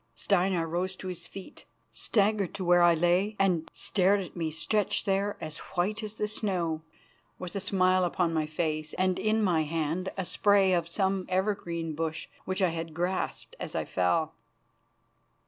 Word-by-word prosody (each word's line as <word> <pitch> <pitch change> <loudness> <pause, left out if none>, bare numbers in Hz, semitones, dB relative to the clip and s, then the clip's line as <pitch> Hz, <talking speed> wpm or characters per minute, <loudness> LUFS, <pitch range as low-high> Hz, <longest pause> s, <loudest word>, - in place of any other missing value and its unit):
Steinar 180 - +1
rose 180 +3 -2
to 185 - -6
his 175 -2 -6
feet, 195 -1 -11 0.3
staggered 205 -3 +1
to 190 -2 -3
where 175 0 +5
I 175 -1 +6
lay, 175 +6 +2
and 180 -5 +1
stared 195 +1 +2
at 185 - -7
me 165 -2 -1
stretched 205 +6 0
there 200 +1 0
as 155 0 -6 0.2
white 205 +5 +1
as 215 0 -6
the 210 - -1
snow, 180 -7 -1 0.6
with 180 0 -7
a - - 0
smile 185 -1 +2
upon 175 -1 +1
my 155 -1 0
face 155 -1 -2
and 185 0 +1
in 215 0 +2
my 175 -5 +3
hand 160 +4 -1
a 190 - -1
spray 200 0 +3
of 170 -1 0
some 190 0 0
evergreen 180 -4 -1
bush 160 +1 -3 0.2
which 190 +1 -1
I 185 - +4
had 165 -1 -5
grasped 180 +2 -2
as - - -6
I - - -1
fell. 150 - +1
180 Hz, 170 wpm, -29 LUFS, 165-195 Hz, 0.6 s, I